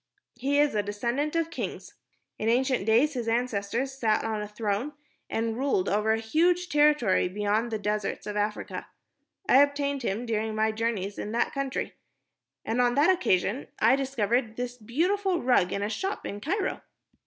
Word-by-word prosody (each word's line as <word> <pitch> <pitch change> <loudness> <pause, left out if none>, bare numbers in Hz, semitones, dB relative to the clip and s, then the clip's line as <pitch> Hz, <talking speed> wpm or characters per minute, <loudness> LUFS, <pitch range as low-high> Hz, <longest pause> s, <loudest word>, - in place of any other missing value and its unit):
"He 270 +4 0
is 295 0 +3
a 210 - +1
descendant 235 +9 -2
of 330 0 0
kings. - - -5 0.5
In 220 - 0
ancient 250 -3 +1
days 245 +7 +4
his 240 -3 -3
ancestors 235 +2 -1
sat 225 -5 +1
on 220 -1 -2
a 210 - -4
throne 210 +6 -2 0.4
and 225 0 -1
ruled 260 -7 0
over 210 +2 +1
a 220 - +2
huge 340 +10 +1
territory 295 -11 +3
beyond 210 +4 0
the 220 - -2
deserts 210 0 -2
of 210 - -4
Africa. 210 0 -3 0.6
I 265 - +7
obtained 285 -1 +1
him 230 +1 -2
during 220 -1 -1
my 220 0 +2
journey 215 -3 -2
in 210 - -5
that 235 - 0
country. 275 -1 -3 0.7
And 235 +3 +1
on 245 0 +2
that 300 +6 +5
occasion 260 - +1
I - - +5
discovered 245 -3 0
this 245 0 -4
beautiful 350 - 0
rug 240 -8 +3
in 200 - -2
a - - 0
shop 385 - -3
in 205 +1 -5
Cairo." 380 - -1
235 Hz, 170 wpm, -27 LUFS, 210-280 Hz, 0.7 s, I